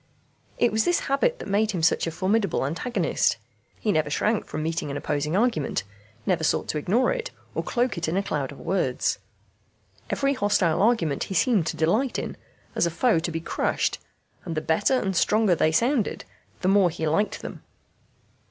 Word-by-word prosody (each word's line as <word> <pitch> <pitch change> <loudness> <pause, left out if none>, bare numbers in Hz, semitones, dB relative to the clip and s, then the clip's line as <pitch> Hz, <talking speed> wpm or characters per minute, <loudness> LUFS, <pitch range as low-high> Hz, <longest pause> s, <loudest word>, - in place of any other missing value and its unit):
It 240 - +3
was 220 +1 +2
this 350 - +2
habit 375 - +1
that - - -8
made 205 +2 +2
him 180 -6 -2
such 165 - +3
a - - -2
formidable 190 -1 0
antagonist. 170 - 0 0.4
He 215 - +1
never 155 -3 +1
shrank 210 +8 0
from 155 - -4
meeting 165 -2 -2
an 140 - -3
opposing 150 +4 -1
argument, 205 - 0 0.4
never 175 -3 +1
sought - - +1
to 155 - -1
ignore 220 - +2
it, - - -4 0.2
or - - -1
cloak 245 -6 -1
it 170 - -2
in 165 +4 0
a 200 - +1
cloud 145 -8 -2
of 140 - -11
words. 165 -8 0 0.9
Every 275 0 +1
hostile 205 - +2
argument 205 - +2
he 190 - -5
seemed 195 -3 +3
to - - -3
delight 215 +12 +1
in, - - -4 0.4
as - - +2
a - - 0
foe 170 +3 +2
to 170 - -3
be 165 0 -3
crushed, 165 - -1 0.4
and 170 -3 -5
the - - +1
better 185 +12 +2
and 190 -4 -2
stronger 210 +1 +3
they 155 -1 +2
sounded 235 - +1 0.4
the 185 - 0
more 195 -2 +5
he 160 -1 -4
liked 200 +8 0
them. - - -7
185 Hz, 190 wpm, -25 LUFS, 160-220 Hz, 0.9 s, more